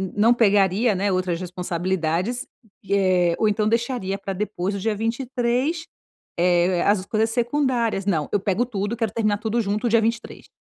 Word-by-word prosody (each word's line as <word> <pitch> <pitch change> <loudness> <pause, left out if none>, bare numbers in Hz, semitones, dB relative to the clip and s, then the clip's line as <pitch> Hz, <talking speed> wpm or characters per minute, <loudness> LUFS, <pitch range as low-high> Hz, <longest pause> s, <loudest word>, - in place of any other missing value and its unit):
não 220 +3 +4
pegaria, 205 0 +3
né, 200 +1 0
outras 180 -2 -1
responsabilidades, 180 +4 -2 0.4
eh, 185 -3 +3
ou 220 - +3
então 210 +1 0
deixaria 230 -4 -1
para 195 -1 -5
depois 195 -1 -3
do - - -3
dia 220 0 0
23, 250 - -1 0.5
eh, 175 0 +2
as 200 -2 +2
coisas 220 +2 0
secundárias, 240 -4 0
não, 160 -7 0
eu 205 - +3
pego 205 +4 0
tudo 205 -2 -3
e - - -19
quero 225 -5 -1
terminar 210 -2 +1
tudo 225 +2 0
junto 210 +3 -1
dia 230 0 +4
23. 230 +2 -3
205 Hz, 165 wpm, -23 LUFS, 185-235 Hz, 0.5 s, não